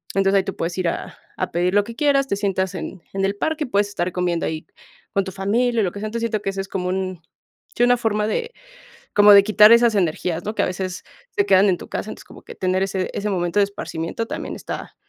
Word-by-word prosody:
Entonces, 195 0 +3
ahí 190 - 0
tú 195 - -5
puedes 170 +1 -3
ir 180 - 0
a - - -6 0.2
a - - -2
pedir 180 +2 0
lo 205 - +5
que 230 +2 -9
quieras, 275 -1 +2
te 200 - 0
sientas 190 -2 -1
en 180 +1 -6
en 195 0 0
el 195 +1 -1
parque, 315 +3 -1
puedes 205 -3 +1
estar 180 -3 -2
comiendo 175 -2 -1
ahí 160 0 -4 0.5
con 195 - +2
tu 190 - -5
familia 225 +5 +1
y - - +2
lo 180 - 0
que 200 - -8
sea. 215 - -3
Entonces, 230 +2 -4
siento 215 -1 -2
que 195 - -1
eso 195 0 -3
es 195 - -7
como 180 -1 -2
un 185 -2 -3 0.5
sí, 240 - +2
una 245 0 +5
forma 215 -3 0
de, 470 - -2 0.6
como 205 0 +8
de 200 - +9
quitar 215 +1 +7
esas 235 -1 +5
energías, 170 -1 -1
¿no? 215 - -3
Que - - +1
a - - +1
veces 185 0 -4 0.3
se 400 - +2
quedan 195 +2 +5
en 180 - 0
tu - - -10
casa, - - -4
entonces - - -10
como - - -15
que - - -11
tener 185 0 0
ese 190 -1 -1
ese 210 +1 -2
momento 175 0 -1
de - - +5
esparcimiento 200 +1 -5
también - - -5
está, - - -7
195 Hz, 255 wpm, -22 LUFS, 185-215 Hz, 0.6 s, de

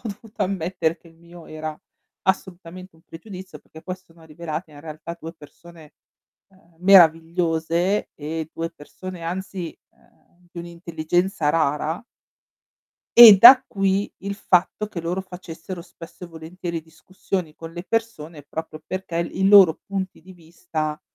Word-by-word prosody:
dovuto 215 +1 -10
ammettere 180 -3 -2
che 170 - -20
il 165 - -22
mio 170 0 -15
era 155 0 -6 0.5
assolutamente 185 -1 -4
un 160 - -24
pregiudizio 185 +2 -11
perché 160 - -16
poi 185 0 -5
si 185 - -28
sono 165 -2 -20
rivelate 160 +1 -6
in 145 - -14
realtà 155 +2 -8
2 165 +1 -7
persone, 160 0 -16 0.5
ehm, 180 -4 -27
meravigliose 170 0 +3
e 155 +1 -5
2 165 0 -4
persone, 170 +3 -10
anzi, 180 0 -5 0.2
ehm, 175 0 -30
di 175 - -10
un'intelligenza 170 0 -2
rara. 155 0 0 1.1
E 225 -4 +12
da 245 +6 +10
qui, 195 0 0
il 200 +1 -5
fatto 190 +2 +1
che 180 -5 -6
loro 175 +3 -2
facessero 180 -1 -9
spesso 170 0 -12
e - - -8
volentieri 165 +1 -6
discussioni 160 +1 -6
con 165 0 -9
le 175 0 -7
persone 170 -9 -4
proprio 155 +1 -7
perché 185 -2 -5
il 170 0 -1
i 190 - +4
loro 195 -5 +7
punti 195 -1 -5
di 185 +1 -14
vista 160 -3 -5
170 Hz, 145 wpm, -22 LUFS, 160-185 Hz, 1.1 s, E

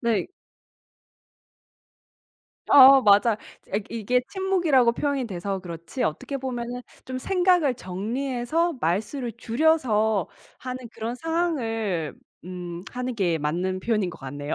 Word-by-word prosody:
네. 230 -6 +1 2.4
어어 270 -1 +9
맞아요. 210 +1 +5 0.4
아 200 - +2
이게 230 +2 +1
침묵이라고 345 -11 +2
표현이 280 -2 -1
돼서 195 +1 -3
그렇지, 170 +7 -6
어떻게 160 - -2
보면은 245 -2 -4 0.2
좀 255 - -5
생각을 355 -4 +2
정리해서 245 - -2
말수를 220 - -1
줄여서 225 - +1 0.3
하는 255 -1 -6
그런 225 +2 -4
상황을 230 - -1 0.3
음 175 -1 -7
하는 250 0 -4
게 175 -7 0
맞는 175 +5 -1
표현인 210 -4 0
것 - - -12
같네요. 145 +2 -5
235 Hz, 255 characters per minute, -25 LUFS, 190-270 Hz, 2.4 s, 어어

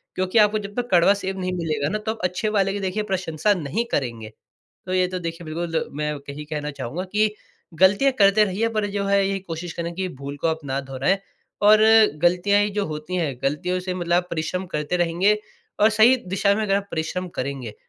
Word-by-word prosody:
क्योंकि 185 +4 0
आपको 210 0 +4
जब 205 0 -8
तक 245 - -12
कड़वा 180 +2 +6
सेब 190 0 -3
नहीं 185 0 -2
मिलेगा 155 -4 -1
ना 215 - -1
तो 215 +1 -3
आप 225 - -7
अच्छे 180 +4 -1
वाले 195 -2 +1
की 205 - -3
देखिए 195 +2 -2
प्रशंसा 185 -1 0
नहीं 180 - -2
करेंगे। 115 -5 -2 0.6
तो 185 - -3
ये 185 0 +3
तो 185 0 -4
देखिए 165 0 -6
बिल्कुल 165 +1 -2
मैं 150 0 -1 0.2
यही 150 +2 -6
कहना 150 -1 -4
चाहूँगा 140 +6 -5
कि 210 0 +2 0.5
गलतियाँ 200 +9 +5
करते 200 +1 +6
रहिए 210 +4 0
पर 210 - +1
जो 200 -1 -2
है 200 - +3
यही 195 0 -1
कोशिश 170 -2 -6
करें 170 0 -4
कि 190 +1 -2
भूल 140 +1 -5
को - - +2
आप 160 0 -1
ना 135 0 -1
दोहराएँ 135 +8 0 0.5
और 215 0 +7 0.4
गलतियाँ 200 +4 +3
जो 200 - 0
होती 155 +4 -5
हैं 150 -7 -1
गलतियों 180 +6 -1
से 180 0 -4
मतलब 175 -1 -2
आप 180 - -1
परिश्रम 170 +3 -2
करते 150 +4 -1
रहेंगे 175 +5 +2 0.4
और 215 - +6
सही 220 +4 +5 0.2
दिशा 200 +1 +3
में 220 - -1
अगर 195 -2 +1
आप 200 0 -2
परिश्रम 170 +3 -3
करेंगे 130 -5 -4
180 Hz, 210 wpm, -23 LUFS, 155-200 Hz, 0.6 s, और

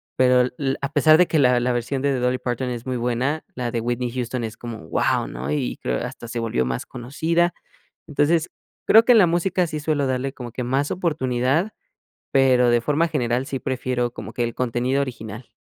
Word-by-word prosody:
pero 125 -1 +4
le 135 -2 -1
a 140 - -2
pesar 155 +1 +5
de 180 - +5
que 160 - +1
la 125 -2 +4
la 125 +1 0
versión 120 +3 -2
de 140 -1 +2
de 130 - -1
Dolly 125 +1 +1
Parton 125 0 -3
es 120 -1 -5
muy 130 -1 -2
buena, 125 +6 -1
la 125 -1 -3
de 115 - -2
Whitney 120 +1 -2
Houston 125 0 -3
es 110 -1 -5
como, 120 -2 -8
¡guau! - - +1
¿no? 65 +3 -6
Y - - -1
creo 60 -1 -2
hasta 120 - -8
se 120 +1 -4
volvió 115 - 0
más 60 0 -3
conocida, 165 +8 -1 0.5
entonces 155 +3 +1 0.4
creo 225 +1 +7
que 245 - +6
en - - +6
la 185 - +6
música 175 +2 +1
sí 155 -1 -4
suelo 150 -2 0
darle 130 +1 -2
como 125 -4 -8
que 125 - -4
más 135 +4 0
oportunidad, 150 - 0 0.6
pero, 130 -2 +4
de 120 0 +3
forma 150 +6 +1
general, 125 -4 -1
sí 135 - -3
prefiero 125 -2 -2
como - - -8
que 120 - -1
el 115 -1 -3
contenido 125 +2 0
original. 115 -3 -7
125 Hz, 210 wpm, -22 LUFS, 120-145 Hz, 0.6 s, creo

